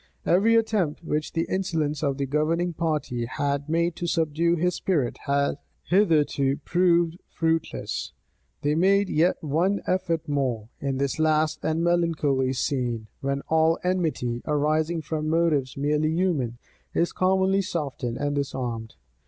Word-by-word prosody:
Every 210 +6 +4
attempt 210 -9 +1
which 155 -1 -2
the 165 - 0
insolence 160 -6 -1
of 140 -3 0
the 140 - -1
governing 160 +5 0
party 150 -7 -1
had 140 +3 -2
made 170 +1 +1
to 175 - -3
subdue 165 0 +1
his 180 +2 +1
spirit, 155 -9 -1
had 140 +1 +1 0.2
hitherto 150 -7 +2
proved 175 -1 +2
fruitless; 165 -1 -2 0.5
they 145 +1 +2
made 195 +4 +3
yet 165 +4 +3
one 170 +7 +1
effort 170 -3 -1
more, 130 -7 -1
in 135 -1 -2
this 140 +2 -1
last 155 0 +1
and 160 +1 0
melancholy 160 -6 +1
scene, 125 -4 -2
when 140 0 -2
all 160 +1 +3
enmity, 160 -10 -1
arising 155 +2 +1
from 155 0 -2
motives 155 -6 +1
merely 150 +2 +1
human, 160 -9 0 0.4
is 170 - +1
commonly 190 +1 +2
softened 140 -9 -3
and 145 0 -1
disarmed. 125 - -3
155 Hz, 135 wpm, -25 LUFS, 140-170 Hz, 0.5 s, Every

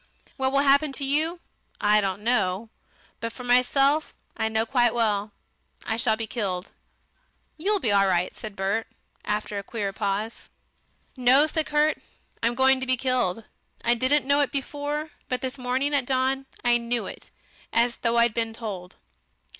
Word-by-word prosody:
What 265 0 0
will 275 0 +3
happen 280 +1 +4
to 275 - -3
you 315 +5 +1 0.4
I 210 0 +4
don't 195 +1 -2
know, 215 -2 0 0.5
but 230 0 -3
for 250 - -10
myself, 275 +5 +2 0.2
I 220 -1 0
know 220 0 +1
quite 240 -1 +2
well; 210 -3 0 0.5
I 220 - -1
shall 225 -1 +3
be 225 - -3
killed." 195 -5 -3 0.8
"You'll 400 +6 0
be 225 - +1
all 200 -1 +4
right," 180 -1 0
said 215 -3 -8
Bert, 200 +3 -1 0.4
after 210 -1 -2
a - - -7
queer 200 -2 -4
pause. 205 +2 -3 0.7
"No!" 260 +3 +5
said 310 -1 -1
Kurt, 300 +1 +2 0.4
"I'm 235 +1 +1
going 265 +1 +4
to 260 - -3
be 255 0 +2
killed. 245 -5 0 0.4
I 235 - +5
didn't 260 +4 +2
know 280 +1 +3
it 285 - +2
before, 290 +2 -3 0.2
but 255 0 -1
this 260 +1 -4
morning, 260 +3 0
at 270 -3 +1
dawn, 265 +1 0 0.2
I 240 0 +5
knew 235 0 -2
it - - -9 0.4
as 235 +1 +2
though 235 0 0
I'd 235 -1 +4
been 225 0 -2
told." 200 -6 -7
240 Hz, 170 wpm, -25 LUFS, 215-270 Hz, 0.8 s, No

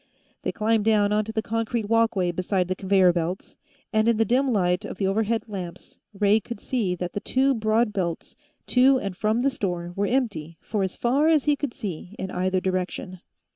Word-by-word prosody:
They - - -2
climbed 220 0 +1
down 210 -2 +3
onto 215 +1 0
the 220 -1 -2
concrete 225 0 -2
walkway 225 -5 +2
beside 185 +1 -1
the 185 - -1
conveyor 190 -2 +3
belts, 175 +2 -4 0.3
and 215 +1 +3
in 235 -2 +3
the 225 - +3
dim 260 +3 +2
light 180 -4 +1
of - - -7
the 195 - -1
overhead 220 +3 0
lamps 185 -5 -8
Ray 205 +1 +3
could 220 0 -8
see 210 -9 -1
that 180 0 -5
the - - -2
two 270 +5 +2
broad 220 -1 +1
belts, 170 -4 -3 0.3
to 260 +2 +5
and 195 -6 -4
from 215 +5 0
the 275 +2 +2
store, 175 -8 -3
were 200 +1 0
empty 195 - -1
for 210 -2 -3
as 190 -1 -2
far 270 +6 +2
as 315 -4 +4
he 295 -1 +3
could 280 -3 -4
see 185 0 -6
in 190 0 -5
either 185 +1 0
direction. 185 0 -3
210 Hz, 200 wpm, -25 LUFS, 185-230 Hz, 0.3 s, to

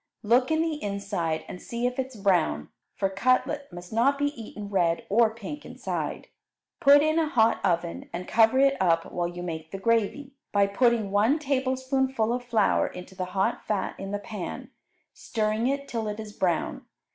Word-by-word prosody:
Look 245 +4 +3
in 320 0 +2
the 315 -2 -2
inside 200 -5 -2
and 180 - -8
see 235 +1 -3
if 250 +1 -1
it 260 - 0
is 260 - -15
brown, 175 - +1 0.3
for 195 - +1
cutlet 255 +7 0
must 175 +2 -10
not 265 +5 +3
be 285 0 +1
eaten 215 -4 -8
red 175 -4 +1
or 225 +2 +5
pink 230 +7 -8
inside. - - -4 0.5
Put 285 +1 +7
in 310 +1 +2
a 315 -2 +1
hot 230 -4 +3
oven 170 -2 -1
and 180 +1 -5
cover 225 +3 +4
it 275 0 +5
up 165 -2 +2
while 175 -1 -1
you 175 0 -7
make 160 -2 -5
the 195 - -6
gravy, 230 +6 0 0.2
by 200 -1 +4
putting 220 0 +2
one 215 +9 +3
tablespoonful 260 -4 0
of 245 0 -3
flour 240 -2 +2
into 180 +1 -9
the 185 -1 -3
hot 190 - +1
fat 210 -2 -1
in 195 - -5
the 205 - -1
pan, 205 -2 -7 0.4
stirring 215 +1 -1
it 280 +1 -1
till 225 -2 -3
it 210 +1 -4
is 215 -1 -7
brown. 175 -5 -1
220 Hz, 185 wpm, -27 LUFS, 195-260 Hz, 0.5 s, Put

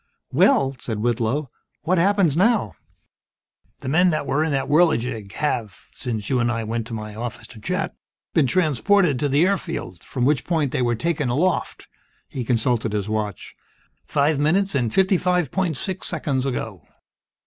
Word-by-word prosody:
"Well," 135 0 +3
said 110 -3 -4
Whitlow, 120 +5 -1 0.3
"what 175 +3 +2
happens 190 -4 +3
now?" 195 - +2 1.1
"The - - -7
men 175 +7 +4
that 155 -3 -1
were 150 +3 +1
in 160 - -1
that 135 -1 0
Whirligig 125 - +2
have 115 -10 -2
since 110 -5 -4
you 130 - +1
and 120 0 +1
I 115 -1 -2
went 115 +1 -3
to 115 - -5
my 105 -1 -6
office 115 +2 -6
to 115 - -12
chat 180 - -2 0.4
been 155 -6 +3
transported 180 -1 +2
to 145 - 0
the 145 +5 +4
airfield, 170 - -3
from 125 -2 -2
which 140 -2 +2
point 155 -6 0
they - - -1
were 120 -1 +1
taken 150 0 -1
aloft 165 +9 -1 0.2
" - - -40
he 130 - -4
consulted 115 -2 0
his 105 -1 -1
watch, 105 -3 -3 0.5
"five 145 0 +2
minutes, 190 +7 +2
and 120 -5 0
fifty 190 - +3
five 180 -3 +1
point 180 -7 -1
six 185 +8 -3
seconds 140 -5 -1
ago." 110 -8 -4
140 Hz, 170 wpm, -22 LUFS, 115-170 Hz, 1.1 s, men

